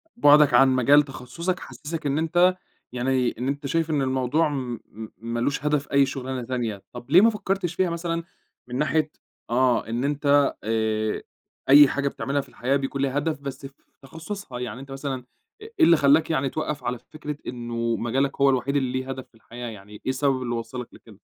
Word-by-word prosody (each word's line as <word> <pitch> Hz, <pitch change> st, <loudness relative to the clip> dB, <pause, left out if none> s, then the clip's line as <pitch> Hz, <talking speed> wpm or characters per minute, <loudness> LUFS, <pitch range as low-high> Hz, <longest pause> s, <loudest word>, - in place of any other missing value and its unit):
بُعدك 145 Hz, -, +6 dB
عن 135 Hz, +2 st, +7 dB
مجال 140 Hz, +4 st, +5 dB
تخصُّصك 140 Hz, +7 st, -4 dB
حسِّسك 150 Hz, +5 st, -7 dB
إن 140 Hz, 0 st, +1 dB
أنت 175 Hz, +3 st, +3 dB, 0.4 s
يعني 125 Hz, 0 st, 0 dB
إن 125 Hz, +3 st, -3 dB
أنت 140 Hz, +1 st, -2 dB
شايف 165 Hz, +2 st, 0 dB
إن 150 Hz, -3 st, +1 dB
الموضوع 130 Hz, +4 st, +1 dB
م 125 Hz, -5 st, -4 dB
م 110 Hz, +1 st, -8 dB
مالوش 120 Hz, +5 st, -2 dB
هدف 150 Hz, -1 st, 0 dB
أي 140 Hz, 0 st, +5 dB
شغلانة 130 Hz, -1 st, -4 dB
تانية، 115 Hz, -5 st, -3 dB
طَب 120 Hz, +2 st, -10 dB
ليه 180 Hz, -, +8 dB
ما 225 Hz, -, +6 dB
فكّرتش 195 Hz, -5 st, -2 dB
فيها 185 Hz, -1 st, +1 dB
مثلًا 170 Hz, 0 st, -3 dB, 0.4 s
من 125 Hz, -, -6 dB
ناحية 150 Hz, +2 st, +1 dB, 0.4 s
آه 125 Hz, -1 st, +2 dB
إن 120 Hz, +2 st, -2 dB
أنت 145 Hz, 0 st, +2 dB
آآ، 110 Hz, 0 st, -1 dB, 0.5 s
أي 145 Hz, +1 st, +9 dB
حاجة 140 Hz, +1 st, -1 dB
بتعملها 140 Hz, 0 st, -1 dB
في -, -, -16 dB
الحياة 130 Hz, +3 st, -1 dB
بيكون 135 Hz, 0 st, -2 dB
لها 140 Hz, 0 st, 0 dB
هدف 150 Hz, +1 st, -1 dB
بس 140 Hz, 0 st, -7 dB
في 135 Hz, -, -10 dB, 0.3 s
تخصُّصها، 160 Hz, -1 st, -7 dB
يعني 125 Hz, 0 st, -5 dB
أنت 135 Hz, +1 st, -11 dB
مثلًا 135 Hz, 0 st, -3 dB, 0.5 s
أ -, -, -10 dB
إيه 445 Hz, +1 st, -12 dB
اللي 170 Hz, -, +6 dB
خلّاك 145 Hz, +2 st, +4 dB
يعني 135 Hz, -4 st, 0 dB
توَقّف 150 Hz, -1 st, -4 dB
على 125 Hz, 0 st, -2 dB
فكرة 150 Hz, +1 st, -8 dB
إنه 120 Hz, -1 st, -2 dB
مجالك 135 Hz, +5 st, -1 dB
هو 140 Hz, -, +6 dB
الوحيد 135 Hz, +1 st, 0 dB
اللي 130 Hz, -3 st, +1 dB
ليه 130 Hz, 0 st, -7 dB
هدف 130 Hz, -1 st, -6 dB
في -, -, -30 dB
الحياة، 120 Hz, +2 st, -9 dB
يعني 105 Hz, -1 st, -12 dB
إيه 105 Hz, -, -10 dB
السبب 130 Hz, 0 st, +1 dB
اللي 120 Hz, -1 st, -2 dB
وصّلك 120 Hz, +1 st, -5 dB
لكده؟ -, -, -16 dB
135 Hz, 195 wpm, -24 LUFS, 125-150 Hz, 0.5 s, أي